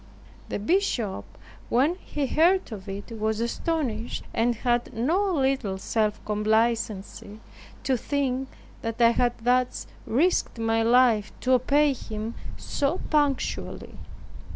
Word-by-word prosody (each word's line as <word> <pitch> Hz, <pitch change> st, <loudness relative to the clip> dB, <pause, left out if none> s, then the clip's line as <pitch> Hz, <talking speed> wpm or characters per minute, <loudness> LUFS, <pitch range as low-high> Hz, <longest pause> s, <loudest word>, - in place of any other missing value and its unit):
The -, -, -2 dB
bishop, 220 Hz, -, 0 dB, 0.4 s
when 270 Hz, +8 st, +3 dB
he 300 Hz, -5 st, -4 dB
heard 340 Hz, +4 st, +3 dB
of 200 Hz, -2 st, -7 dB
it, 200 Hz, +4 st, -7 dB
was 220 Hz, -1 st, -1 dB
astonished, 235 Hz, -2 st, -2 dB
and 235 Hz, +1 st, +1 dB
had 240 Hz, +1 st, 0 dB
no 345 Hz, -, +1 dB
little 265 Hz, -8 st, 0 dB
self 215 Hz, +2 st, 0 dB
complacency 215 Hz, -1 st, -1 dB, 0.4 s
to 260 Hz, -2 st, +1 dB
think 265 Hz, 0 st, -1 dB, 0.3 s
that 230 Hz, 0 st, -4 dB
I 235 Hz, -1 st, +6 dB
had 240 Hz, 0 st, +1 dB
thus 250 Hz, 0 st, +1 dB, 0.2 s
risked 315 Hz, +3 st, +1 dB
my 225 Hz, 0 st, +1 dB
life 230 Hz, -2 st, +4 dB
to 255 Hz, -, 0 dB
obey 280 Hz, +3 st, +4 dB
him 220 Hz, -2 st, -6 dB, 0.2 s
so 290 Hz, +6 st, -1 dB
punctually. 290 Hz, -3 st, -1 dB
240 Hz, 120 wpm, -26 LUFS, 220-275 Hz, 0.4 s, I